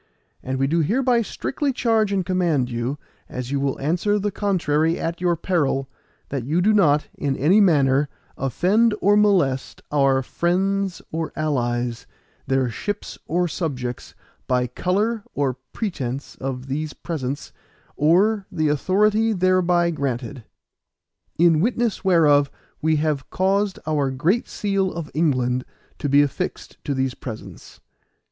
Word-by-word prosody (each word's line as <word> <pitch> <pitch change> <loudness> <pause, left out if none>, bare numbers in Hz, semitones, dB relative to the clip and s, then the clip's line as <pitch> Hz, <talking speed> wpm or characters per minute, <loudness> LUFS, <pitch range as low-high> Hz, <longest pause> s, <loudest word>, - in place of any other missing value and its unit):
And 130 +1 -3
we 135 - +1
do 165 +5 +1
hereby 240 - +2
strictly 275 +5 -2
charge 225 -4 +1
and 190 -3 0
command 170 -9 +1
you 120 +4 -2 0.3
as 125 +1 -5
you 140 - 0
will 135 -1 -1
answer 175 +8 +1
the 205 0 -1
contrary 165 -6 +1
at 170 +1 -3
your 175 -1 +2
peril, 150 -6 0 0.4
that 135 -3 -3
you 150 +8 0
do 210 +4 +3
not, 150 -8 +3
in 140 -2 -2
any 180 +10 +4
manner, 145 -6 +3 0.3
offend 200 - +2
or 205 +1 +4
molest 180 -11 +2
our 135 -2 +3
friends 190 +4 -1
or 160 0 -3
allies, 120 -5 -1 0.4
their 135 -1 +2
ships, 205 - -5
or 175 +2 +1
subjects, 130 -8 -4 0.3
by 125 -1 +2
colour 200 - -1
or 140 -2 +1 0.2
pretence 140 - -4
of 130 -1 -4
these 150 +3 -3
presents, 145 -3 -5 0.4
or 190 +7 +3
the 155 -2 0
authority 210 +8 +2
thereby 180 -2 +2
granted. 130 -4 -3 0.9
In 165 -1 +4
witness 235 0 0
whereof 150 -6 +4 0.3
we 160 0 +2
have 150 -3 -1
caused 195 +1 +1
our 150 -3 +1
Great 165 - 0
Seal 195 -2 -1
of 165 -3 -6
England 130 -5 +1 0.4
to 145 - -2
be 145 +1 +6
affixed 140 - -5
to 140 - -1
these 130 -1 0
presents. 110 -8 -9
155 Hz, 140 wpm, -22 LUFS, 135-190 Hz, 0.9 s, be